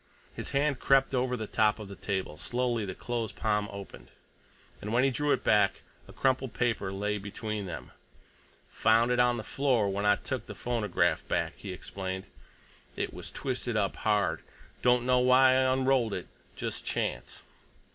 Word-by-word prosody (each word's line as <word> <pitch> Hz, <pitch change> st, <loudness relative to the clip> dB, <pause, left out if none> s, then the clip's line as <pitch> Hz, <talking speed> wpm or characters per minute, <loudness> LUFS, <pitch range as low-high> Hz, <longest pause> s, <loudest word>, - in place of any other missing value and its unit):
His -, -, -5 dB
hand 140 Hz, -1 st, +1 dB
crept 135 Hz, 0 st, +3 dB
over 125 Hz, -1 st, +1 dB
the 110 Hz, -, -4 dB
top 105 Hz, 0 st, +2 dB
of 105 Hz, -2 st, -8 dB
the 100 Hz, -, -9 dB
table; 95 Hz, -6 st, -3 dB
slowly 120 Hz, +3 st, -1 dB
the 95 Hz, -2 st, -5 dB
closed 115 Hz, -3 st, -3 dB
palm 105 Hz, -1 st, 0 dB
opened, 100 Hz, -1 st, -10 dB, 0.7 s
and 105 Hz, -, -5 dB
when 120 Hz, +3 st, +3 dB
he 135 Hz, -, +3 dB
drew 145 Hz, +3 st, 0 dB
it -, -, +1 dB
back, -, -, +3 dB, 0.2 s
a -, -, -12 dB
crumpled 130 Hz, -1 st, 0 dB
paper 115 Hz, -5 st, 0 dB
lay 105 Hz, +2 st, -2 dB
between 105 Hz, 0 st, -4 dB
them. 80 Hz, -5 st, -7 dB, 0.8 s
"Found 115 Hz, +2 st, +3 dB
it 125 Hz, -, +2 dB
on 125 Hz, 0 st, +4 dB
the 110 Hz, -, -4 dB
floor 125 Hz, -4 st, +1 dB
when 100 Hz, +1 st, -2 dB
I 105 Hz, 0 st, +5 dB
took -, -, -5 dB
the -, -, -7 dB
phonograph 115 Hz, -6 st, 0 dB
back," -, -, 0 dB
he 100 Hz, -, -7 dB
explained. 95 Hz, +1 st, -5 dB, 0.7 s
"It -, -, -3 dB
was -, -, -7 dB
twisted 125 Hz, -3 st, -2 dB
up 100 Hz, -2 st, 0 dB
hard. 100 Hz, -7 st, +1 dB, 0.4 s
Don't 125 Hz, 0 st, +3 dB
know 125 Hz, 0 st, +4 dB
why 130 Hz, +1 st, +6 dB
I 130 Hz, 0 st, +3 dB
unrolled 130 Hz, -4 st, +2 dB
it. -, -, -5 dB, 0.3 s
Just -, -, -4 dB
chance." -, -, -3 dB
115 Hz, 175 wpm, -29 LUFS, 100-125 Hz, 0.8 s, why